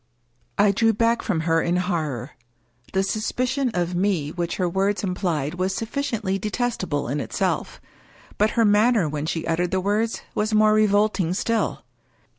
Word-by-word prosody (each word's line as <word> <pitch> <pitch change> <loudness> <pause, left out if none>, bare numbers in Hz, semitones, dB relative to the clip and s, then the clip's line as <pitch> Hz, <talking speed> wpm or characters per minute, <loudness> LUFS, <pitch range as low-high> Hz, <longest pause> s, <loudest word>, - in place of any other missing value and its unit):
I 205 0 +5
drew 225 +3 +2
back 230 +2 +2
from 175 -7 -1
her 165 0 +2
in 175 +1 0
horror. 155 - -2 0.6
The 190 0 +2
suspicion 250 +6 -1
of 175 0 0
me 175 -5 0
which 175 0 -3
her 185 - 0
words 195 +4 0
implied 175 -6 -1
was 185 +2 -1
sufficiently 225 -5 -2
detestable 210 - -2
in 140 +4 -2
itself. - - -2 0.6
But 210 +1 +4
her 230 - +5
manner 210 -2 +4
when 150 +1 -3
she 165 -1 -2
uttered 170 +2 0
the 190 - 0
words 210 +4 -1
was 215 +1 0
more 215 0 +5
re 215 0 +4
volting 205 -4 +1
still. 230 +2 -1
195 Hz, 160 wpm, -23 LUFS, 170-215 Hz, 0.6 s, I